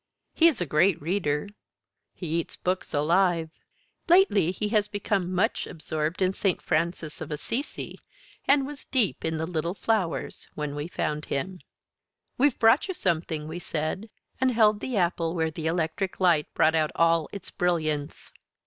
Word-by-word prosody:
He 335 - +6
is 325 - +2
a 175 - 0
great 170 +5 +3
reader. 150 -1 -1 0.7
He 180 - -7
eats 165 - -5
books 185 +1 -2
alive. 165 +2 +2 0.6
Lately 340 - +5
he 210 +3 -3
has 210 -2 +2
become 200 -3 -1
much 185 +1 0
absorbed 155 +2 -2
in 185 +1 +2
Saint 190 -2 0
Francis 165 -1 -1
of 160 - -5
Assisi, 230 - -4 0.5
and 275 0 +4
was 290 0 -8
deep 240 -8 0
in 160 0 -1
the 160 - -1
"Little 170 +1 -2
Flowers" 205 -7 -1
when 150 -1 -3
we 145 +2 -4
found 150 -3 -2
him. 180 +7 -3 0.8
"We've 280 0 +2
brought 225 - +4
you 375 - -3
something," 160 - -1
we 160 +3 -5
said, 170 +6 -3 0.3
and 260 0 +3
held 215 -3 +4
the 250 0 -3
apple 170 -2 0
where 160 -1 0
the 160 0 -4
electric 165 +3 -1
light 170 -5 +3
brought 160 - +4
out 155 -1 +2
all 165 -1 +3
its 200 -2 -8
brilliance. 155 -5 -1
175 Hz, 160 wpm, -27 LUFS, 160-205 Hz, 0.8 s, He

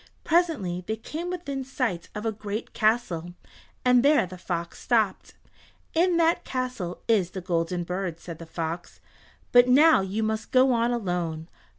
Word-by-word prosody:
Presently 305 - +1
they 220 - -1
came 315 +10 -6
within 285 -7 -4
sight 250 -10 -3
of 210 +1 -5
a 225 - +1
great 210 +1 -6
castle, 185 -7 0 0.5
and 250 -1 +6
there 290 -3 +4
the 185 +1 -9
fox 170 -1 -4
stopped. 220 -6 0 0.6
"In 345 +1 +3
that 335 0 +3
castle 250 -9 -4
is 205 -6 +3
the 190 - -6
Golden 175 0 -1
Bird," 180 -1 -4
said 170 -2 -9
the 165 - -9
fox, 165 +1 -5 0.5
"but 245 0 +7
now 300 +1 +6
you 195 +3 -2
must 220 0 -2
go 260 0 +5
on 235 0 +2
alone. 175 -7 -2
215 Hz, 160 wpm, -26 LUFS, 175-255 Hz, 0.6 s, but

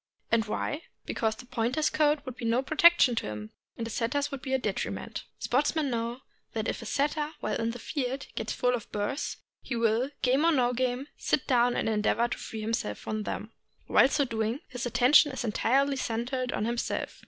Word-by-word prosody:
And 230 -2 +3
why? 290 +8 -2 0.2
Because 220 -1 0
the 220 - -11
Pointer's 250 +5 0
coat 300 -1 +2
would 255 - -6
be - - -9
no 230 +3 +2
protection 310 -2 +6
to - - -1
him 105 0 -6 0.3
and 230 - -3
the 230 - -5
Setter's 280 +7 -1
would 275 -2 -5
be 265 - -5
a 265 - +4
detriment, 210 -6 -3
Sportsmen 290 +2 +1
know 235 +2 -2 0.3
that 225 0 -2
if - - -2
a 230 - -7
Setter 295 +4 0
while 215 - -1
in 230 - 0
the 235 - -4
field 265 +1 -3
gets 220 - -3
full 250 0 +1
of 240 -3 -4
burs, 210 +7 -2 0.2
he 255 - -4
will, 230 +3 +2
game 265 +4 +3
or 335 - +5
no 250 -5 +2
game, 250 +1 -1
sit 275 - 0
down 245 -2 +3
and - - 0
endeavor 220 +2 +2
to - - -3
free 220 - -6
himself 215 - -2
from 215 0 -4
them. 215 +1 -4 0.3
While - - +6
so 285 0 +2
doing 225 +3 -2
his 250 -1 -3
attention 255 +4 +5
is 260 - -3
entirely 270 +5 +2
centered 250 +1 -2
on 210 - -1
himself. 235 +1 -2
245 Hz, 200 wpm, -29 LUFS, 225-275 Hz, 0.3 s, protection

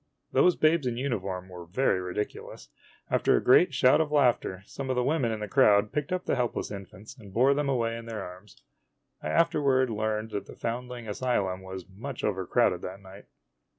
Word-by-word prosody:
Those 180 - +4
babes 155 -3 +2
in 120 -1 -2
uniform 95 -8 -3
were 90 -2 -10
very 95 0 +1
ridiculous. 90 +3 -5 0.4
After - - +3
a - - -2
great 145 +6 +6
shout 130 +2 +4
of 155 -2 -2
laughter, 120 -9 +2
some 135 +5 -7
of 130 - +1
the 125 - +1
women 135 -4 +1
in 110 -1 -4
the 105 - -3
crowd 105 +1 +4
picked 150 +2 -3
up 185 0 -2
the - - 0
helpless 125 -4 -2
infants 100 +3 -10
and 105 -7 -14
bore 130 +7 +4
them 145 0 -1
away 115 -3 0
in 115 0 -8
their 110 -3 -5
arms. 90 +3 -12 0.6
I - - -4
afterward 135 -6 +2
learned 110 0 -2
that 100 -1 -4
the - - -11
foundling 120 0 -5
asylum 100 -4 -1
was 95 -1 -8
much 120 +8 -8
overcrowded 95 -1 +1
that 95 +2 -7
night. 95 +1 -14
115 Hz, 190 wpm, -28 LUFS, 95-130 Hz, 0.6 s, great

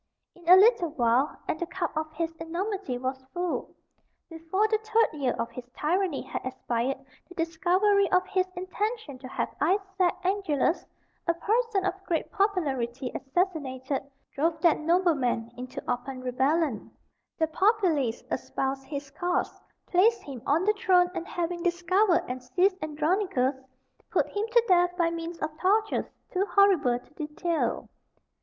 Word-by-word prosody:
In 345 -1 -8
a 365 - +11
little 415 -2 +5
while, 255 -1 +1
and 315 - -1
the 345 - -2
cup 360 -2 -3
of 310 0 -2
his 325 +1 -3
enormity 340 - -3
was 260 +1 -4
full. 355 -1 -2 0.6
Before 330 +6 0
the 435 0 +1
third 440 -4 +2
year 270 -4 0
of 235 - -3
his 245 +1 -9
tyranny 350 0 0
had - - -5
expired 255 0 -2 0.3
the 360 - -13
discovery 370 +5 +2
of 365 0 +3
his 375 -1 0
intention 370 - -3
to 260 - -8
have - - -3
Isaac 380 +2 +1
Angelus, 365 -5 0 0.4
a 335 - +3
person 435 +1 +1
of 380 0 -2
great 330 -2 -1
popularity, 275 - 0
assassinated, 275 -3 -1 0.3
drove 320 +3 0
that 335 -3 +4
nobleman 305 -9 +1
into 250 +1 -7
open 255 +1 -3
rebellion; 265 +1 0 0.5
the 320 - +3
populace 320 - +1
espoused 270 0 -2
his 280 0 -6
cause, 350 +4 -2 0.2
placed 430 +6 +3
him 265 -5 -8
on 310 +5 +3
the 425 - +4
throne, 360 -3 +3
and 345 - -4
having 345 0 -3
discovered 360 +2 +2
and 255 +1 -4
seized 370 +10 +1
Andronicus, 310 -2 +1 0.6
put - - +2
him 415 +2 -2
to 470 0 +4
death 355 -1 +3
by 335 -2 +2
means 335 0 -5
of 310 0 -3
tortures 425 +3 +1 0.2
too 385 +2 0
horrible 375 -13 +4
to 250 +3 -17
detail. 315 +2 -2
335 Hz, 150 wpm, -28 LUFS, 275-380 Hz, 0.6 s, a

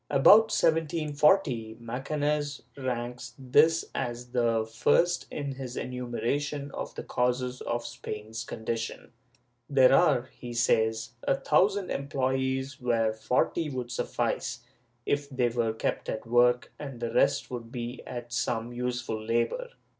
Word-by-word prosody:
^ - - -47
About 215 +11 +7
1740, 150 - +2
Macanaz 145 +4 -2
ranks 125 -2 -4
this 145 +5 +4
as 120 -1 -4
the 115 -2 +2
first 170 +10 +2
in 140 -2 -4
his 130 -2 -6
enumeration 140 +3 -2
of - - -6
the - - -5
causes 125 0 -1
of 120 0 -2
Spain's 110 +1 -6
condition; 115 0 -4 0.6
there 135 -2 +6
are, 135 -6 +4
he 120 -1 -7
says, 110 -1 +2
a - - +2
thousand 195 +1 +2
employees 130 0 -1
where 115 -3 +1
forty 125 +8 0
would 125 -3 -4
suffice, 120 0 -2 0.4
if 145 0 0
they 130 -3 +1
were 115 -1 0
kept 110 - -2
at 110 - -4
work, 120 +1 +3
and 135 -5 -7
the 115 -1 -3
rest 125 - +3
could 120 -2 -6
be 120 0 -5
set - - -17
at 120 -1 -6
some 120 0 -1
useful 120 -3 -3
labor. 120 - 0
125 Hz, 135 wpm, -28 LUFS, 120-140 Hz, 0.6 s, About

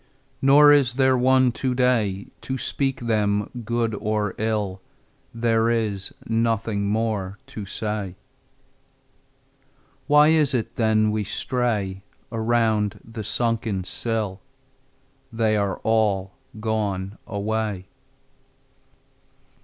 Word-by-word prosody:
Nor 145 +2 +7
is 135 -4 +4
there 130 -1 +4
one 130 0 +4
today 125 -7 0 0.2
To 130 - -3
speak 135 +1 -1
them 105 -3 0
good 115 0 -1
or 105 -1 -1
ill: 105 -4 -1 0.5
There 115 -1 +1
is 105 -5 -1
nothing 115 -2 0
more 105 -3 -1
to 105 -3 -8
say. 105 -3 -3 1.9
Why 150 +1 +6
is 155 -4 +3
it 115 - -2
then 110 -1 +2
we 105 0 -1
stray 105 -3 -2 0.3
Around 110 -2 +1
the 115 -1 -7
sunken 115 -3 -1
sill? 105 -1 -3 0.9
They 110 -1 +1
are 100 -2 0
all 105 -4 +1 0.3
gone 105 -3 -2
away. 105 -2 -2
110 Hz, 100 wpm, -23 LUFS, 105-120 Hz, 1.9 s, Nor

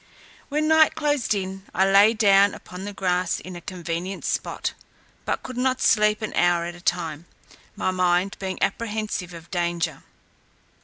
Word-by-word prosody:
When 300 +1 0
night 315 0 +5
closed 290 -7 0
in, 190 0 -4
I 190 - +4
lay 200 +3 +6
down 200 -2 +5
upon 180 +2 -9
the 205 - -5
grass 180 -2 0
in 185 0 -9
a 175 - -8
convenient 175 +1 -5
spot, - - -2 0.5
but - - -2
could 255 -1 -7
not 260 0 +1
sleep 210 0 +3
an 215 - -4
hour 175 -1 +2
at 175 - -5
a 175 - -13
time, 170 -2 -2 0.5
my 185 - 0
mind 180 +1 +1
being 190 -1 -4
apprehensive 215 -5 -2
of 170 -1 -12
danger. 175 -1 -1
190 Hz, 160 wpm, -24 LUFS, 175-215 Hz, 0.5 s, lay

